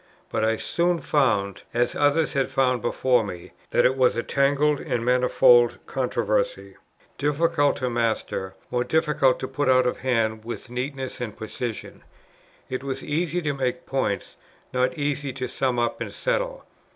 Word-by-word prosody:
But - - 0
I 110 0 +2
soon 175 +6 0
found, 105 - +1
as 120 0 +2
others 145 +2 +2
had 135 -1 0
found 130 -2 +1
before 125 0 +2
me, 90 -4 -8 0.2
that - - +3
it 130 - +4
was 130 -1 +3
a 115 - -1
tangled 145 +1 +2
and 120 -1 -2
manifold 125 -1 +5
controversy, - - -1 0.4
difficult 145 0 +2
to 125 - -2
master, 110 -5 -1 0.2
more 125 0 +1
difficult 150 -2 +2
to 130 - -2
put 135 +1 -1
out 130 -1 +5
of 125 - -1
hand 110 -4 0
with 120 +1 -7
neatness 130 +1 -4
and 110 -4 -5
precision. 110 +1 -6 0.6
It 130 0 -4
was 135 -1 -4
easy 170 +3 -1
to 145 -2 0
make 125 -2 -2
points, 130 -7 -2 0.4
not 130 0 +1
easy 145 -1 -1
to 130 0 -4
sum 130 0 -1
up 120 -1 -1
and - - -4
settle. - - -2
130 Hz, 160 wpm, -24 LUFS, 120-145 Hz, 0.6 s, manifold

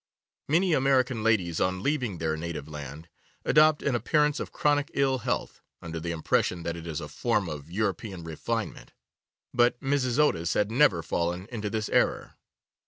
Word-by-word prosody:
Many 170 +4 +3
American 130 -4 +2
ladies 100 -7 +1
on 95 +1 0
leaving 130 - -1
their 80 -1 -1
native 80 -2 -5
land 75 +1 -8 0.4
adopt 155 0 +5
an 140 - +1
appearance 150 +4 +2
of - - -5
chronic 145 0 +1
ill 135 -1 +2
health, - - -3 0.2
under 85 0 -6
the 85 +1 -4
impression 85 +1 0
that 85 0 -3
it 85 0 -8
is 80 -3 -4
a - - -6
form 105 -6 0
of 75 -1 -7
European 95 -1 -2
refinement, 80 -2 -4 0.6
but 120 0 +3
Mrs. 135 -3 0
Otis 85 - +2
had 105 +1 +1
never 125 - +4
fallen 85 +3 -2
into 110 -3 -3
this 110 0 -2
error. - - +1
105 Hz, 165 wpm, -27 LUFS, 85-135 Hz, 0.6 s, adopt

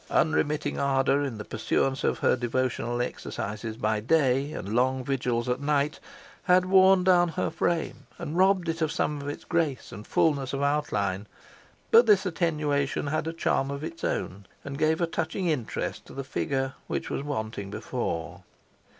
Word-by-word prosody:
Unremitting 150 -1 +1
ardour 135 0 +2
in 135 -6 -3
the 105 - -7
pursuance 135 0 0
of - - +1
her - - +3
devotional 120 -1 -1
exercises 110 -1 -5
by 110 -1 0
day, 135 +2 +2
and 105 -9 -5
long 130 +2 +2
vigils 125 -3 -1
at 125 +2 -1
night, 145 +1 0 0.5
had 180 0 +5
worn 190 0 +6
down 180 -1 +5
her 165 - -2
frame, 170 -2 -2
and 150 - -5
robbed 185 -1 +3
it 165 0 -2
of 160 -1 +1
some 150 -3 -1
of 140 - -4
its 145 - -6
grace 160 -6 -1
and 105 +2 -9
fulness 140 -5 +1
of 140 +1 -1
outline; 105 -9 0 0.6
but 235 +1 +7
this 205 -2 +5
attenuation 150 -6 0
had 155 +2 -1
a - - -1
charm 135 -4 0
of 140 +1 -5
its 165 +1 -7
own, 100 +1 -3 0.2
and 140 0 -6
gave 155 +2 +2
a - - +4
touching 165 +3 -3
interest 145 -9 -2
to - - -12
her 135 - -4
figure, 135 0 -2
which - - -3
was - - -2
wanting 110 -8 -4
before. 105 -5 -4
140 Hz, 170 wpm, -27 LUFS, 125-160 Hz, 0.6 s, but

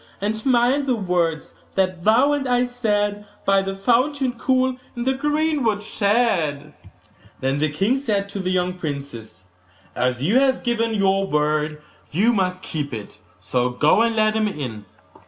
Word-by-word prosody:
And 220 +2 -2
mind 255 +3 +3
the 255 - +2
words 175 -6 -1 0.2
that 185 -2 0
thou 250 +7 +4
and 280 -2 -1
I 245 0 +3
said 210 -4 -1 0.2
By 195 0 +4
the 195 0 -4
fountain 255 +6 +1
cool, 255 +1 0 0.2
in 240 - -3
the 265 +1 +1
greenwood 295 -6 0
shade.' 200 -10 0 0.7
Then 135 +2 -1
the 155 +1 +1
king 195 - +1
said 205 -7 -1
to 200 - -5
the 185 -1 -2
young 180 0 0
princess, 140 - -7 0.5
'As 125 0 -1
you 210 - +4
have 265 -1 +1
given 230 -2 0
your 195 -1 +2
word 150 0 0 0.3
you 215 +10 +2
must 185 -3 -1
keep 145 -5 -4
it; 105 -2 -9 0.2
so 120 +8 0
go 150 - +3
and 230 0 +1
let 215 -1 +3
him 215 -1 +1
in. 125 - -5
200 Hz, 160 wpm, -22 LUFS, 155-240 Hz, 0.7 s, thou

